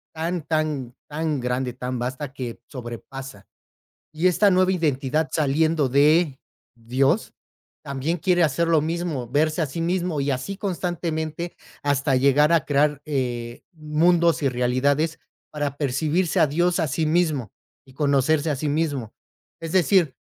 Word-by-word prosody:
tan 165 Hz, 0 st, -2 dB
tan 150 Hz, -6 st, -2 dB
tan 155 Hz, -1 st, -2 dB
grande, 125 Hz, 0 st, -2 dB
tan 125 Hz, 0 st, -4 dB
basta 130 Hz, +3 st, -4 dB
que 125 Hz, -4 st, -6 dB
sobrepasa. 125 Hz, -3 st, -8 dB, 0.7 s
Y 160 Hz, +4 st, +1 dB
esta 200 Hz, +3 st, +4 dB
nueva 185 Hz, 0 st, +3 dB
identidad 155 Hz, -2 st, 0 dB
saliendo 155 Hz, 0 st, +2 dB
de 145 Hz, +2 st, +3 dB, 0.4 s
Dios 135 Hz, -, 0 dB, 0.5 s
también 140 Hz, +4 st, -2 dB
quiere 175 Hz, +1 st, +2 dB
hacer 160 Hz, +3 st, +1 dB
lo 160 Hz, -3 st, +4 dB
mismo, 160 Hz, -5 st, -2 dB
verse 155 Hz, +5 st, +1 dB
a -, -, +2 dB
sí 165 Hz, +5 st, -5 dB
mismo 175 Hz, -2 st, -1 dB
y 140 Hz, 0 st, 0 dB
así 165 Hz, +10 st, -3 dB
constantemente, 170 Hz, -3 st, -3 dB, 0.3 s
hasta 140 Hz, -1 st, +1 dB
llegar 140 Hz, +4 st, +4 dB
a 165 Hz, -4 st, +3 dB
crear, 145 Hz, 0 st, +1 dB
eh, 120 Hz, -5 st, -3 dB
mundos 165 Hz, 0 st, +2 dB
y 140 Hz, -, +2 dB
realidades 140 Hz, +6 st, 0 dB, 0.3 s
para 145 Hz, -2 st, -3 dB
percibirse 155 Hz, +5 st, +1 dB
a 155 Hz, -, +5 dB
Dios 175 Hz, +5 st, +1 dB
a 160 Hz, -, +1 dB
sí 155 Hz, +3 st, 0 dB
mismo, 155 Hz, -, 0 dB, 0.3 s
y 130 Hz, -, -17 dB
conocerse 145 Hz, +2 st, +2 dB
a 140 Hz, -, -2 dB
sí 150 Hz, -, -2 dB
mismo. 145 Hz, -7 st, -1 dB, 0.5 s
Es 165 Hz, -1 st, -5 dB
decir, 180 Hz, -5 st, +3 dB
150 Hz, 145 wpm, -23 LUFS, 135-165 Hz, 0.7 s, a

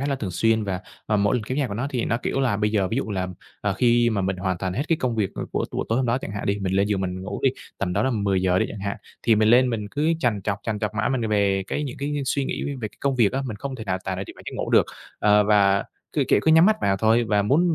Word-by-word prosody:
khá 140 Hz, -, -1 dB
là 140 Hz, -, 0 dB
thường 105 Hz, -8 st, -4 dB
xuyên, 110 Hz, +3 st, +1 dB
và, 95 Hz, -2 st, -3 dB, 0.3 s
ờ, 105 Hz, -, +2 dB
mỗi 100 Hz, +4 st, +2 dB
lần 115 Hz, -, -2 dB
kéo 130 Hz, +6 st, -3 dB
dài 140 Hz, -5 st, 0 dB
của 100 Hz, -, -5 dB
nó 120 Hz, +5 st, -2 dB
thì 125 Hz, -3 st, -1 dB
nó, 115 Hz, -, 0 dB
kiểu 135 Hz, -, -1 dB
là, 120 Hz, -6 st, +1 dB
bây 105 Hz, 0 st, +1 dB
giờ 100 Hz, -4 st, +1 dB
ví 115 Hz, -, -2 dB
dụ 135 Hz, -, -2 dB
là, 95 Hz, -2 st, -2 dB, 0.3 s
ờ, 100 Hz, -, 0 dB
khi 120 Hz, +3 st, +3 dB
mà 105 Hz, -3 st, 0 dB
mình 95 Hz, 0 st, -1 dB
hoàn 90 Hz, -1 st, -2 dB
toàn 95 Hz, -1 st, -2 dB
hết 125 Hz, -, -1 dB
cái 165 Hz, -, +3 dB
công 125 Hz, -3 st, -1 dB
việc, 105 Hz, -3 st, 0 dB
ờ, -, -, -4 dB
của -, -, 0 dB
của -, -, -2 dB
tối 115 Hz, -, +1 dB
hôm 130 Hz, -, +1 dB
đó 120 Hz, +3 st, +1 dB
chẳng 100 Hz, -, -7 dB
hạn 100 Hz, -, -4 dB
đi, 100 Hz, +1 st, 0 dB
mình 95 Hz, -1 st, -2 dB
lên 100 Hz, +1 st, +2 dB
giường 100 Hz, -2 st, 0 dB
mình 95 Hz, 0 st, -3 dB
ngủ 95 Hz, -, -5 dB
đi, -, -, +4 dB, 0.3 s
tầm 90 Hz, -, -1 dB
đó 100 Hz, +3 st, +1 dB
là 130 Hz, -, +1 dB
10:00 95 Hz, -5 st, +1 dB
đi -, -, +1 dB
chẳng 105 Hz, -, -7 dB
hạn, 100 Hz, +2 st, -3 dB, 0.3 s
thì 115 Hz, -, +4 dB
mình 110 Hz, 0 st, +3 dB
lên 125 Hz, +2 st, +5 dB
mình 105 Hz, -3 st, -3 dB
cứ 155 Hz, +3 st, +1 dB
trằn 115 Hz, -8 st, 0 dB
trọc, 100 Hz, 0 st, -1 dB
trằn 110 Hz, -2 st, -2 dB
trọc 105 Hz, 0 st, -3 dB
mãi 115 Hz, -, 0 dB
m 120 Hz, -5 st, -1 dB
về 100 Hz, -2 st, +2 dB
cái 150 Hz, -, -2 dB
những 130 Hz, -, -6 dB
cái 145 Hz, +1 st, -2 dB
suy 140 Hz, +1 st, 0 dB
nghĩ -, -, -3 dB
về 130 Hz, -6 st, -4 dB
cái -, -, -26 dB
công 140 Hz, -1 st, +1 dB
việc 110 Hz, -5 st, +3 dB
á, 135 Hz, +1 st, -1 dB
mình 110 Hz, -4 st, -5 dB
không 135 Hz, +4 st, -5 dB
thể 110 Hz, -, -7 dB
nào 95 Hz, -1 st, -1 dB
tài 95 Hz, -1 st, -2 dB
nào 95 Hz, -, -4 dB
chìm -, -, -11 dB
vào -, -, -13 dB
giấc -, -, -5 dB
ngủ -, -, -3 dB
được. -, -, +5 dB, 0.3 s
Ờ, 105 Hz, 0 st, +4 dB
và 100 Hz, -1 st, +3 dB, 0.3 s
cứ, -, -, +1 dB
kiểu, -, -, +4 dB
cứ 160 Hz, -, +3 dB
nhắm 160 Hz, +2 st, +7 dB
mắt 215 Hz, 0 st, +4 dB
vào 95 Hz, -1 st, +2 dB
thôi 115 Hz, +3 st, +3 dB
và 105 Hz, -2 st, +2 dB
muốn 160 Hz, -, +3 dB
105 Hz, 330 wpm, -24 LUFS, 100-125 Hz, 0.3 s, nhắm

